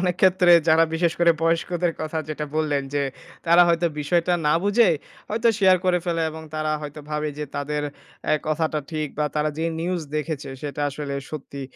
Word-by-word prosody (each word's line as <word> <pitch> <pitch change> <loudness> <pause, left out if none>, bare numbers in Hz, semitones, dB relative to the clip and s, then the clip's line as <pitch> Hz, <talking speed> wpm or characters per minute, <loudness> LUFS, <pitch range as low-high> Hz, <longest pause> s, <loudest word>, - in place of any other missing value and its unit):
অনেক 180 -1 +1
ক্ষেত্রে 185 -1 +6 0.2
যারা 160 +1 +6
বিশেষ 165 0 +2
করে 170 0 +5
বয়স্কদের 170 +1 +1
কথা 155 +1 -3
যেটা 150 0 -3
বললেন 150 -3 +1
যে, 145 - +1 0.4
তারা 170 +1 +7
হয়তো 170 0 +2
বিষয়টা 170 +4 +1
না 150 - +4
বুঝে 205 +2 +4 0.4
হয়তো 225 +2 +1
শেয়ার 190 -2 +6
করে 180 -1 +3
ফেলে 170 -2 0
এবং 160 0 -8
তারা 155 0 -1
হয়তো 150 0 -7
ভাবে 150 0 -1
যে, 150 - -2
তাদের 145 +1 -2 0.4
অ্যা - - +2
কথাটা 155 0 0
ঠিক 155 -2 -2
বা 150 - +2
তারা 150 0 +1
যে, 160 - -1 0.2
নিউজ 175 +1 -1 0.2
দেখেছে 150 -2 -3
সেটা 145 -1 -5
আসলে 140 0 -5 0.2
সত্যি। 140 -2 -7
160 Hz, 185 wpm, -23 LUFS, 150-175 Hz, 0.4 s, তারা